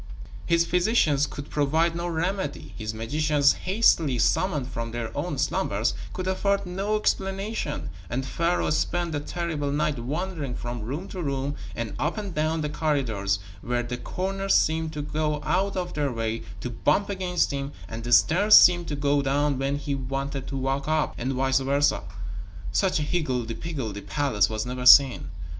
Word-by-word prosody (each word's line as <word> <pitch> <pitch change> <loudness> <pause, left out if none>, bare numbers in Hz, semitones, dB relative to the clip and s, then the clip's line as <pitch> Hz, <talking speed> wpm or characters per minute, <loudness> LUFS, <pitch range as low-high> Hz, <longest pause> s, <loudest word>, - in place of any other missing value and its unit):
His 170 0 +3
physicians 175 -7 +2
could 145 0 -8
provide 160 +4 +1
no 170 +1 -2
remedy, 175 -1 -3
his 110 -1 -4
magicians 145 +6 +2
hastily 185 - +2
summoned 150 0 +1
from 115 -3 -4
their 115 -1 -5
own - - -2
slumbers - - 0 0.2
could 185 - -4
afford 200 +1 0
no 195 +4 -1
explanation, 195 -4 -2 0.2
and 130 +3 -2
Pharaoh 170 +4 0
spent 170 +2 0
a 145 - 0
terrible 155 -2 -3
night 150 -2 0
wandering 150 +1 -3
from 120 -1 -5
room 140 - -4
to 185 - -5
room 140 -2 -2 0.2
and 115 -2 -4
up 150 +9 -1
and 200 -4 -4
down 155 +1 0
the 150 - -1
corridors, 130 -11 0 0.2
where 120 0 -1
the 120 +1 -4
corners 195 +8 -1
seemed 160 0 +2
to 150 -1 -4
go 150 0 -1
out 195 +1 0
of 180 -1 -3
their 145 -2 0
way 115 -1 -2 0.2
to 125 - -4
bump 150 - +1
against 185 -2 0
him 140 0 -3 0.2
and 115 0 -6
the 120 - -4
stairs 185 - +6
seemed 175 -1 +7
to 150 - -2
go 140 0 +2
down 140 0 +1
when 135 +1 0
he 145 0 -3
wanted 135 0 -3
to 135 - -4
walk 135 +2 -1
up, 155 -1 +1
and 130 +3 -1
vice 135 +1 +2
versa. 140 +2 +2 0.7
Such 190 -2 +2
a 150 - 0
higgledy 130 -8 -1
piggeldy 125 -10 -5
palace 120 -9 +1
was 110 0 -2
never 125 0 -2
seen. 130 - +7
145 Hz, 170 wpm, -26 LUFS, 130-175 Hz, 0.7 s, seemed